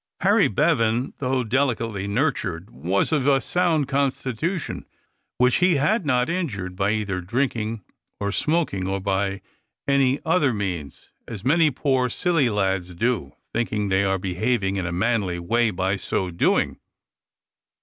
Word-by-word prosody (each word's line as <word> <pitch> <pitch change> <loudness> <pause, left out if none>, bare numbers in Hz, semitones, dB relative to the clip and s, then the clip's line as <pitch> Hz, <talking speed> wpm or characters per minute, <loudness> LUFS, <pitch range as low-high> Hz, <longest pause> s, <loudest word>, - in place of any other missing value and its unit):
Harry - - +4
Bevan, 115 +3 +1
though 130 -1 0
delicately 115 -5 -1
nurtured, 100 - -1
was 90 - -1
of 145 -4 +1
a 135 -1 +5
sound 165 -3 +1
constitution, 140 - -2 0.5
which 125 0 +4
he 180 -1 +3
had 170 +6 +1
not 125 -2 +2
injured 105 - -3
by 100 +1 +1
either 105 -4 -1
drinking 115 0 -2 0.4
or 100 0 -1
smoking, 150 - 0
or 95 0 -1
by 95 0 -1 0.4
any 140 -1 +3
other 160 -7 +2
means, 90 -8 -5 0.2
as 110 -1 -8
many 160 +3 +4
poor 130 -2 0
silly 165 -1 +1
lads 95 -4 -1
do, 115 - -1 0.2
thinking 110 -3 -1
they 95 +1 +2
are 95 -1 +1
behaving 95 +2 -1
in 95 -3 -2
a - - -3
manly 95 -1 0
way 115 +7 +1
by 95 0 -1
so 95 -2 -2
doing. 85 - +1
115 Hz, 140 wpm, -23 LUFS, 95-135 Hz, 0.5 s, a